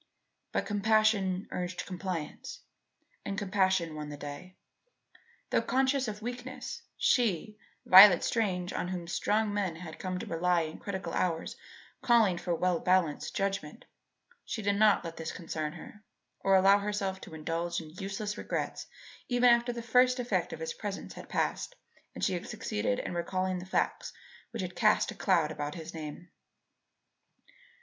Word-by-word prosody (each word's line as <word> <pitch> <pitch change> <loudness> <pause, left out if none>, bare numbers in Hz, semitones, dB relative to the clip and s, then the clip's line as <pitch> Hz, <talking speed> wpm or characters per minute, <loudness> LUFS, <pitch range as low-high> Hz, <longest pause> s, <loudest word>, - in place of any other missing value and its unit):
But - - -1
compassion 205 -2 +2
urged 180 0 -3
compliance 180 -4 -5 0.6
and 195 - -4
compassion 190 -4 +1
won 150 -1 -6
the 145 - -7
day. 145 +6 -8 1.0
Though - - +3
conscious 265 0 +1
of 210 0 -6
weakness, 245 +2 -6 0.2
she, 215 -3 +1 0.3
Violet 190 -1 +10
Strange 185 -6 0
on - - -2
whom 180 -2 -4
strong 210 +4 0
men 195 -5 -1
had 160 -1 -9
come 185 -1 -3
to - - -5
rely 175 +1 +1
in 155 -1 -5
critical 195 -2 -5
hours 165 -3 -1 0.5
calling 220 -7 +4
for 175 -2 -1
well 180 0 +1
balanced 180 -5 +1
judgment, 195 - -3 0.6
she 220 - -5
did 200 0 +2
not 210 -3 +5
let 165 -1 -7
this 160 -1 -4
concern 155 -3 -4
her, 210 - -12 0.4
or 195 0 +3
allow 195 +2 +6
herself 200 -2 -2
to 160 - -10
indulge 165 +2 -2
in 155 -2 -10
useless 200 +4 -4
regrets - - -3 0.4
even 245 0 +5
after 235 +1 +3
the 235 -1 -6
first 250 +2 +4
effect 245 +1 -1
of - - -7
his 485 0 -3
presence - - -6
had - - -11
passed - - -1 0.4
and - - -6
she 190 - +2
had 175 - -4
succeeded 105 -1 -2
in - - -4
recalling 185 +1 -1
the 180 - -9
facts - - -1 0.4
which 230 -4 -4
had 180 0 -6
cast - - +3
a - - -9
cloud 150 - +2
about 145 -1 -4
his 165 -1 -8
name. 160 +2 -7
185 Hz, 155 wpm, -30 LUFS, 170-210 Hz, 1.0 s, Violet